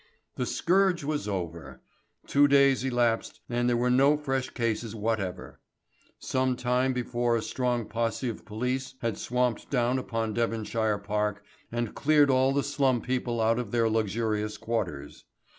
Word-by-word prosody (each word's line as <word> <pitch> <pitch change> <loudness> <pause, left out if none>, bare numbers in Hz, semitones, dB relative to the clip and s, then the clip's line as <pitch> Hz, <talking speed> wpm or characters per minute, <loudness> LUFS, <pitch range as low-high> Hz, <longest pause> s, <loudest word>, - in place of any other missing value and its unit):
The - - -2
scourge 185 -1 +2
was 150 -4 -2
over. 85 -9 -5 0.5
Two 145 +1 +4
days 140 -2 +4
elapsed 120 -3 0
and 120 0 0
there 120 - +2
were 125 +1 +1
no 140 +4 +5
fresh 135 -3 -2
cases 115 -1 -2
whatever. 105 -4 -3 0.6
Some 130 -1 0
time 125 +2 +1
before 120 -1 0
a 115 - 0
strong 125 -3 -1
posse 115 +3 -2
of 115 - -5
police 125 +5 -3
had 115 -3 -2
swamped 125 -1 -1
down 125 -1 +1
upon 115 -3 -2
Devonshire 110 -1 0
Park 105 0 -2 0.3
and 120 -1 -2
cleared 145 -1 +4
all 130 +1 +3
the 140 0 +1
slum 135 -4 +1
people 125 -1 -2
out 115 +1 +2
of 120 -4 -4
their 115 0 +2
luxurious 110 -1 -1
quarters. 105 -11 -4
120 Hz, 150 wpm, -28 LUFS, 110-130 Hz, 0.6 s, no